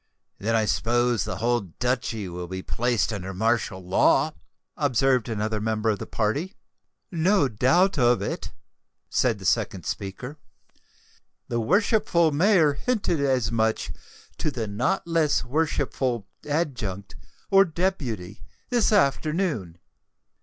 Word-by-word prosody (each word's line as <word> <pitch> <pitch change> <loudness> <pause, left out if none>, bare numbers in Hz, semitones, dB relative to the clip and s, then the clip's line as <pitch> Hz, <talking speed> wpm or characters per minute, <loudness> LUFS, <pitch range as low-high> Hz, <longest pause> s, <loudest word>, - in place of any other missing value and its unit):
"Then 115 +3 0
I 110 -1 +2
suppose 120 0 +1
the - - -4
whole 120 +1 +1
Duchy 110 +2 -2
will 90 0 -6
be 95 +1 -6
placed 120 -2 0
under 95 -2 -5
martial 110 -3 0
law?" 90 - +3 0.4
observed 130 -3 +2
another 110 -1 -2
member 110 0 0
of 105 - -3
the - - -6
party. 145 - -1 0.6
"No 170 -2 +3
doubt 145 - +2
of 120 -1 +4
it," - - -4 0.6
said 120 -4 +2
the 95 - -10
second - - 0
speaker. 125 +9 -5 1.1
"The 120 - 0
worshipful 175 - +2
mayor 165 -1 +4
hinted 200 - -1
as 130 -5 +1
much 110 -1 0 0.5
to - - 0
the 120 -6 -3
not 105 +10 -1
less 165 -3 +1
worshipful 130 -5 -1 0.2
adjunct, 120 - -2 0.4
or 195 0 +7
deputy, 145 - -3 0.3
this 240 -4 +2
afternoon." 150 - +1
120 Hz, 125 wpm, -25 LUFS, 110-155 Hz, 1.1 s, or